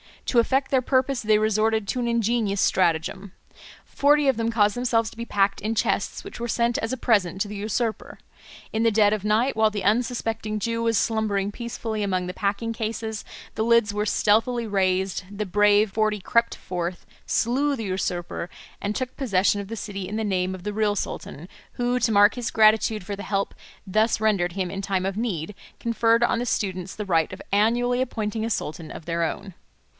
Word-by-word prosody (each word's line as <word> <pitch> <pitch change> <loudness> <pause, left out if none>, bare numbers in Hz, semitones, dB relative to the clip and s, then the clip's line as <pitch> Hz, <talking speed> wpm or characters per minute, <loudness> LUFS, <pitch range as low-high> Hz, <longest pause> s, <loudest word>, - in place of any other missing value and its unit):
To 240 - +3
effect 265 +4 +1
their 265 -2 +3
purpose 260 0 +1
they 215 -1 +3
resorted 215 0 +1
to 255 - -1
an 240 - -1
ingenious 230 -3 +1
stratagem. 180 +2 0 0.5
Forty 290 0 +3
of 265 -4 +3
them 230 0 0
caused 210 -3 +2
themselves 235 -2 +1
to - - -16
be 235 - -4
packed 200 -2 +1
in 220 +2 -2
chests 200 -3 -1
which - - -9
were 235 - -3
sent 235 0 +1
as 225 - -3
a - - -2
present 200 -7 +1
to 210 - 0
the 210 - -7
usurper. 220 +2 -3 0.6
In 220 - 0
the 230 0 +4
dead 210 -1 +4
of 210 -2 -2
night, 225 +6 +2
while 220 0 +4
the 205 -2 -4
unsuspecting 225 0 0
Jew 230 +2 -2
was 230 -1 +2
slumbering 205 -3 0
peacefully 225 -1 -4
among 185 -3 0
the 180 - -5
packing 205 +4 -1
cases, 220 -1 -4 0.3
the 220 - 0
lids 235 -3 +3
were 210 0 -1
stealthily 230 +3 +2
raised, 190 -2 0
the 205 +1 -4
brave 205 +2 +3
forty 215 0 +1
crept 235 +5 +1
forth, 175 0 -5 0.2
slew 275 +5 +1
the 225 - -5
usurper, 180 -3 -3 0.3
and 205 +1 -2
took 255 -1 -3
possession 205 -6 +2
of 200 - -6
the 225 - -5
city 200 -3 -5
in 205 - -5
the 220 - -1
name 190 -2 0
of 180 - -11
the 210 - -3
real 210 -1 +1
sultan, 170 -4 -5 0.3
who, 245 +1 0
to 230 -2 +1
mark 205 0 +5
his 245 -2 -3
gratitude 215 -2 +3
for 200 +1 -4
the - - -6
help 195 -1 -1 0.3
thus 215 +4 +2
rendered 200 -5 +1
him 185 -2 -2
in 195 0 -4
time 190 -1 -1
of 195 +1 -2
need, 210 -5 -2 0.3
conferred 230 0 +2
on 240 - +2
the 245 - -2
students 190 -5 -2
the 210 - -4
right 165 -4 +1
of - - -8
annually 240 +5 +2
appointing 220 -3 -2
a - - -2
sultan 160 -6 -3
of 160 - -9
their 170 0 -1
own. 190 +4 -4
215 Hz, 200 wpm, -24 LUFS, 195-230 Hz, 0.6 s, mark